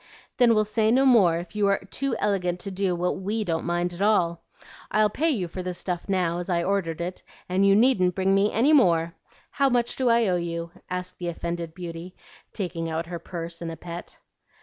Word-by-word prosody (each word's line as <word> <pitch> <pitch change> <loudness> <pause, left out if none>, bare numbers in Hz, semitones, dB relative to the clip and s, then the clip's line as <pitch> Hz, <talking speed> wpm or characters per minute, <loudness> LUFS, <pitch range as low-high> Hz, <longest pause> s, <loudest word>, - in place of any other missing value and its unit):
"Then 240 -3 +5
we'll 215 0 +3
say 215 +1 +1
no 260 +4 +4
more 200 -10 +5
if 175 +3 -8
you 205 -1 +2
are 200 0 +3
too 250 +6 -3
elegant 180 -4 0
to 195 - -4
do 190 -1 0
what 180 +2 -1
WE 215 +3 -1
don't 165 -4 -2
mind 175 +1 -1
at 175 - -8
all. 175 -5 +2 0.5
I'll 215 -1 +2
pay 320 +9 +1
you 205 - -1
for 185 +2 -6
this 180 -1 -4
stuff 180 +1 -4
now, 175 -3 0
as 175 - -5
I 170 -1 +1
ordered 185 -4 -1
it, 180 +2 -4 0.3
and 190 +2 +2
you 195 - +5
needn't 205 -6 +3
bring 190 0 +2
me 200 +2 +3
any 265 +8 +3
more. 170 - +4 0.4
How 275 -1 +2
much 240 -2 +1
do 255 -2 +1
I 230 -1 +4
owe 180 -1 +2
you?" 170 -1 -4 0.2
asked 180 0 -5
the 175 - -4
offended 170 -1 -4
beauty, 175 0 -7 0.4
taking 170 -4 -4
out 160 +1 -2
her 170 0 -6
purse 170 0 -7
in 170 - -4
a 165 - -7
pet. 170 0 -9
180 Hz, 215 wpm, -25 LUFS, 170-210 Hz, 0.5 s, Then